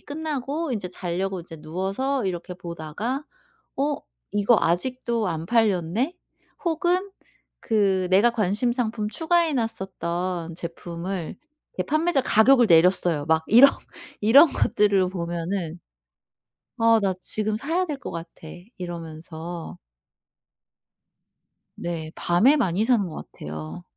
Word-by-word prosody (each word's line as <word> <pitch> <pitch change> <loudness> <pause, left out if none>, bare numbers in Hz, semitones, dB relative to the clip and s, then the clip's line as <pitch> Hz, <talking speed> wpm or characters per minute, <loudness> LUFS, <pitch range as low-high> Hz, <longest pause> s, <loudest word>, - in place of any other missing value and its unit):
끝나고 295 0 -3
인제 205 -6 -3
자려고 180 +1 -3
인제 165 -1 -11
누워서 195 - -2
이렇게 180 -1 -4
보다가 175 - -5 0.5
'어 285 +1 +1 0.4
이거 205 +3 +3
아직도 235 +5 0
안 165 -2 -3
팔렸네?' 220 - +1 0.5
혹은 360 +4 0 0.5
그 195 -4 +1
내가 205 +6 +5
관심 215 +2 0
상품 220 -3 -2
추가해 330 +2 +1
놨었던 185 -7 -3
제품을 170 +1 -5 0.4
이게 - - -2
판매자 310 -1 +1
가격을 245 +1 +5
내렸어요. 170 -3 +4
막 160 0 +2
이런 250 +5 +8 0.5
이런 265 +10 +8
것들을 200 -3 +2
보면은 170 -1 -3 1.0
'어 225 0 +5
나 195 -2 +1
지금 215 +2 -1
사야 330 +9 0
될 295 -4 -4
것 - - -7
같아.' 165 -1 -9 0.3
이러면서 165 - -7 2.0
네. 165 -2 -5
밤에 215 +13 +4
많이 205 - +1
사는 230 -6 +2
것 160 - -9
같아요. 80 +3 -8
195 Hz, 240 characters per minute, -24 LUFS, 170-250 Hz, 2.0 s, 이런